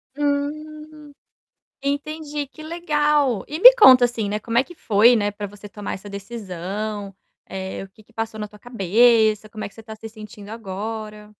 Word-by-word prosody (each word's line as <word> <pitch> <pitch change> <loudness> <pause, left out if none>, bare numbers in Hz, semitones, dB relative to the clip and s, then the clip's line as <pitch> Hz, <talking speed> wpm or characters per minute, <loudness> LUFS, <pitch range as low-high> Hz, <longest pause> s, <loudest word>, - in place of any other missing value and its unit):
Hum, 300 +1 -4 0.7
entendi, 290 +1 -3
que 295 - -14
legal. 295 - +1
E 305 - -5
me - - +11
conta, 255 - +8
assim, 225 -4 -3
né, 210 - -2
como 230 +2 -3
é 250 - +5
que 350 +4 -14
foi, 225 +1 +4
né, 205 -2 0
para 205 0 -6
você 205 +1 -12
tomar 210 -1 -6
essa 200 +2 -9
decisão? 200 0 -6 0.3
Eh, 190 0 -6
o 195 - -12
que 215 +3 -21
que 230 - -27
passou 225 -1 -4
na 210 - -4
tua 210 0 -17
cabeça, 220 0 +3
como 215 0 -7
é - - -3
que - - -25
você 225 - -11
está 220 0 -10
se 225 +1 -9
sentindo 210 -2 -12
agora? 215 0 -7
225 Hz, 185 wpm, -22 LUFS, 205-285 Hz, 0.7 s, me